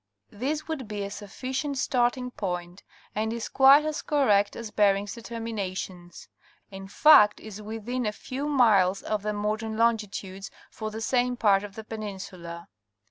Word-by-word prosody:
This 290 +8 -3
would 300 -7 -4
be 205 -1 -4
a 200 - -5
sufficient 255 +8 -4
starting 250 -1 0
point 180 -4 -5 0.3
and 220 +1 -1
is 230 -1 -4
quite 275 +3 +6
as 310 -1 -2
correct 210 -9 +2
as 230 -2 -7
Bering's 200 -1 +2
determinations; 200 -7 -6 0.4
in 195 0 -8
fact 210 -2 +6
is 215 -1 -9
within 225 +3 -4
a - - 0
few 265 +6 -5
miles 205 -9 +3
of 215 -1 -2
the 210 +1 -2
modern 215 +1 -2
longitudes 210 -4 -1 0.2
for 215 -1 -5
the 220 +1 -7
same 245 +1 +1
part 200 -3 +3
of 205 -1 -9
the 220 - -7
peninsula. 190 -6 -7
215 Hz, 150 wpm, -27 LUFS, 200-245 Hz, 0.4 s, quite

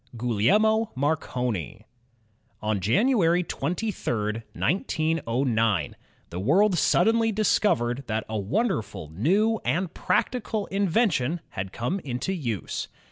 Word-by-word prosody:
GuGLiELMo 205 - +2
Marconi 125 - -2 0.7
On 105 -1 -1
January 175 - +3
23, 120 - -2
1909, 130 - 0 0.4
the 85 - -4
world 180 - +3
suddenly 225 +6 +3
discovered 140 - +1
that 110 -1 -1
a 110 - -5
wonderful, 105 - -2
new, 200 - +2
and 180 0 -1
practical 220 -4 -1
invention 185 - +1
had 95 0 -5
come 125 - -2
into 130 +5 -3
use. 120 - -3
155 Hz, 95 wpm, -26 LUFS, -, 0.7 s, January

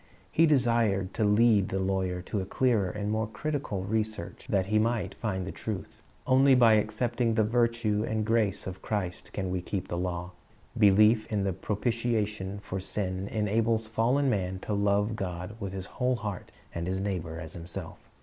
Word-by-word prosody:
He 165 +1 +5
desired 115 -9 +2
to 110 - 0
lead 105 -1 +4
the 95 - -1
lawyer 95 -1 -1
to 100 +1 -2
clearer 110 -3 +1
and 105 +2 -3
more 110 0 0
critical 110 -4 -3
research, 110 -2 -3
that 95 -2 +2
he 110 +2 +2
might 115 +1 0
find 95 -5 -3
the 95 - -5
truth. 105 -4 -6 0.2
Only 135 +1 +5
by 120 -3 +6
accepting 115 +2 +1
the 110 - +4
virtue 115 -2 +1
and 110 -1 -1
grace 105 -3 +1
of 95 0 -6
Christ 100 -6 -3
can 95 -2 -3
we 90 -1 -1
keep 95 +1 -4
the 85 - -2
law. 90 0 -3 0.4
Belief 110 +1 +5
in 105 -2 +1
the 95 -1 0
propitiation 105 -1 -1
for 95 - -4
sin 95 0 -2
enables 110 +1 0
fallen 120 +6 +2
man 95 -6 0
to 105 - -3
love 100 +2 +1
God 90 +1 -5
with 100 -3 -4
his 95 -1 -5
whole 125 +4 0
heart, 105 -4 -5 0.2
and 85 0 -3
his 95 +1 -1
neighbor 90 -5 -3
as 80 -1 -8
himself. 85 0 -7
105 Hz, 175 wpm, -29 LUFS, 95-115 Hz, 0.4 s, by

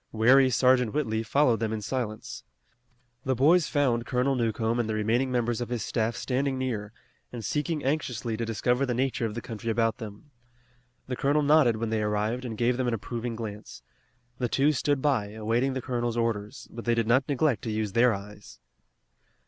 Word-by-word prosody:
Wary 130 +4 +5
Sergeant 125 -1 +3
Whitley 110 -7 0
followed 120 0 +2
them 110 -1 -1
in 110 - -2
silence. 110 0 -4 0.8
The 130 -2 0
boys 155 +6 +4
found 125 -5 +1
Colonel 130 +2 +1
Newcomb 115 -1 0
and 115 -2 -1
the 110 - -1
remaining 115 +5 +1
members 120 -1 0
of 120 - -4
his 120 -2 -2
staff 115 0 -1
standing 135 +2 -1
near, 115 -5 -3 0.4
and 115 -3 -6
seeking 150 0 -1
anxiously 125 -6 -1
to 115 - -3
discover 120 +3 0
the 125 -3 0
nature 125 -2 0
of 105 - -7
the 120 - -5
country 115 -1 -5
about 115 0 +1
them. 110 +5 -9 0.7
The 125 - -3
colonel 145 +4 +1
nodded 145 -6 +4
when 115 0 -3
they 110 -1 0
arrived, 105 +4 -1
and 110 -3 -5
gave 120 +1 +1
them 130 -1 0
an 120 - +1
approving 115 +2 -4
glance. 105 - -8 0.6
The 125 -2 0
two 140 +5 +3
stood 145 -1 0
by, 110 -8 +1
awaiting 115 +5 0
the 130 -2 -4
colonel's 120 -2 -2
orders, 115 +1 -2
but 115 0 -8
they 120 0 +2
did 115 -1 +1
not 130 +5 +2
neglect 140 -6 +1
to - - -2
use 105 -1 -2
their 120 +4 +4
eyes. 105 0 -8
120 Hz, 190 wpm, -27 LUFS, 110-130 Hz, 0.8 s, Wary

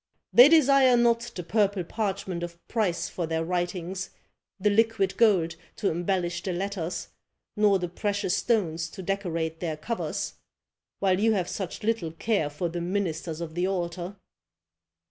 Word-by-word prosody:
They 245 +4 +10
desire 275 -5 +6
not 235 -1 +4 0.2
the 180 - -4
purple 200 0 +1
parchment 195 -2 -3
of 170 0 -8
price 205 -7 0
for 170 -3 -4
their 160 0 -1
writings, 180 +1 -2 0.5
the 205 +2 +3
liquid 220 -2 +2
gold 185 -8 +3 0.2
to 200 - 0
embellish 175 0 -1
the 185 - -3
letters, 180 -2 -3 0.5
nor 210 -2 +4
the 180 -1 -3
precious 200 +1 -1
stones 170 -9 0
to 190 - -9
decorate 165 -4 -2
their 160 -3 -3
covers, 225 +9 -3 0.6
while 190 -1 +2
you 220 +1 +3
have 185 -4 0
such 190 -1 -5
little 210 -8 -1
care 180 -3 0
for 150 +4 -3
the 170 +1 -4
ministers 170 -3 -2
of 165 -2 -5
the 175 +2 0
altar." 175 0 -3
185 Hz, 150 wpm, -27 LUFS, 170-205 Hz, 0.6 s, They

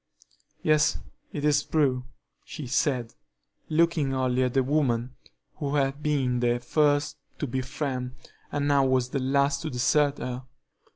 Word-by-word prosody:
"Yes, 155 -1 +3 0.3
it 145 -1 -3
is 145 -1 +4
true," 135 -5 +1 0.4
she 155 - -7
said, 125 -2 0 0.6
looking 155 -4 +2
only 130 -1 +1
at 125 0 0
the 135 - +4
woman 130 -3 0 0.4
who 145 -1 -2
had 140 0 0
been 135 -5 +1
the 120 0 +1
first 145 +3 +1 0.2
to - - -2
befriend 130 0 -3 0.4
and 145 0 -1
now 140 -1 +4
was 130 -1 +2
the 135 - -1
last 140 +1 +1
to 160 - -3
desert 140 +3 +2
her. 125 +1 -5
135 Hz, 140 wpm, -27 LUFS, 125-145 Hz, 0.6 s, is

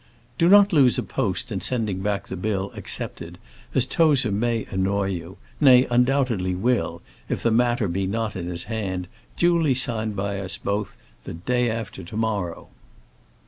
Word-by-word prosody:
Do 170 - +4
not 205 0 +7
lose 135 -6 +5
a - - -1
post 120 -1 -2
in 95 -3 -3
sending 110 -4 -1
back 100 +1 -2
the - - -5
bill 95 0 -2
accepted, 85 +1 -5 0.4
as 130 -2 +4
Tozer 140 -6 +3
may 115 +2 0
annoy 95 +1 0
you 90 +1 -6 0.2
nay, 130 -3 +7
undoubtedly 125 -7 +1
will, 120 +6 -1 0.3
if - - -2
the 115 - +2
matter 120 -1 +2
be 95 +2 -1
not 110 +2 -2
in 90 -2 -4
his 85 -1 -2
hand, 95 -5 -4 0.3
duly 170 -5 +3
signed 110 -4 0
by 100 0 -2 0.3
both - - -24
of 100 0 -1
us, - - -29 0.3
the - - -6
day 125 +8 0
after 110 -4 -5
to 90 +5 -8
morrow. 105 -6 -2
110 Hz, 170 wpm, -24 LUFS, 95-125 Hz, 0.4 s, not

